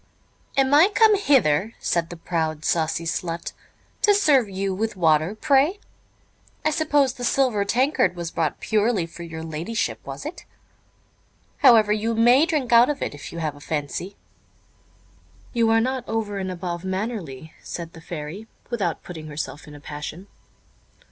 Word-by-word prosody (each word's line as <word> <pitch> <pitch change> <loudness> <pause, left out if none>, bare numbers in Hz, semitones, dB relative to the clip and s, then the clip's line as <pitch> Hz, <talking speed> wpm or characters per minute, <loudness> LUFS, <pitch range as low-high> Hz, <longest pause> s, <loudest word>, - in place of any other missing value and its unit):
"Am 270 0 +3
I 320 +7 +7
come 440 -2 +6
hither," 225 - +2
said 170 -1 -1
the 175 - -8
proud, 160 -2 -2
saucy 165 0 0
slut, 165 0 -3 0.5
"to 410 -1 +5
serve 285 - +4
you 195 0 -2
with 220 +3 -2
water, 160 +1 +2
pray? 285 - +2 0.9
I 310 - +3
suppose 295 -4 +2
the 245 - -8
silver 245 -4 +2
tankard 255 0 +2
was 170 -1 -5
brought 155 -3 -1
purely 215 -4 +1
for 165 +1 -12
your 160 -1 -7
ladyship, 170 +10 -3
was - - -8
it? - - -7 1.2
However, 215 -3 +6
you 225 +2 -1
may 245 +7 +5
drink 290 -8 0
out 235 +3 +7
of 295 - -2
it, - - -3
if 145 - -9
you 170 - -8
have 155 -3 -2
a - - -13
fancy." 155 +6 -4 1.4
"You 230 -2 +2
are 225 0 +4
not 255 +1 -2
over 215 -3 -2
and 190 -1 -3
above 175 -1 -5
mannerly," 190 - -4
answered 170 -1 -7
the 165 - -12
Fairy, 165 +6 -7 0.2
without 195 -9 -2
putting 160 -3 -8
herself 150 0 -6
in 150 - -11
a - - -11
passion. 150 +5 -7
200 Hz, 160 wpm, -23 LUFS, 165-245 Hz, 1.4 s, I